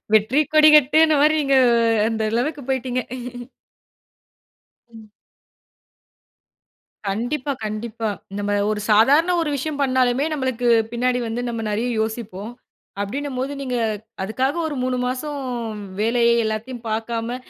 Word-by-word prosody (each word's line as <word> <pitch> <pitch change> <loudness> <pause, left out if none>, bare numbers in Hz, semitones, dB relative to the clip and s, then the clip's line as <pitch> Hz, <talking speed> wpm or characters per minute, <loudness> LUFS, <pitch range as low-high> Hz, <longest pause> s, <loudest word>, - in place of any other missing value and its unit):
"வெற்றி 220 +6 +3
கொடிகட்டுனா," 305 0 +6
மாரி 305 +1 +4
நீங்க 275 -1 +2 0.5
அந்த 225 -1 -1
அளவுக்கு 285 +5 -1
போய்டீங்க. 255 -1 -1 1.9
ம். 220 -2 -15 2.0
கண்டிப்பா, 250 +7 -2
கண்டிப்பா. 215 +1 -4 0.3
நம்ம 205 0 -1 0.2
ஒரு 210 -1 -2
சாதாரண 285 +12 +5
ஒரு 300 - -2
விஷயம் 290 +1 -4
பண்ணாலுமே 260 0 +2
நம்மளுக்கு 260 -4 -1 0.2
பின்னாடி 250 +1 0
வந்து 230 +2 -3
நம்ம 230 -1 -3
நிறைய 225 +4 -1
யோசிப்போம். 220 -1 -4 0.5
அப்படின்னும் 260 +6 -3
போது 270 +2 -2
நீங்க 255 -2 -2 0.5
அதுக்காக 255 - -1
ஒரு 300 - -4
3 255 0 -1
மாதம் 280 +3 -3 0.6
வேலையை 235 +1 +3
எல்லாத்தையும் 230 +3 -4
பார்க்காம 230 +2 -3
245 Hz, 110 wpm, -21 LUFS, 225-275 Hz, 2.0 s, கொடிகட்டுனா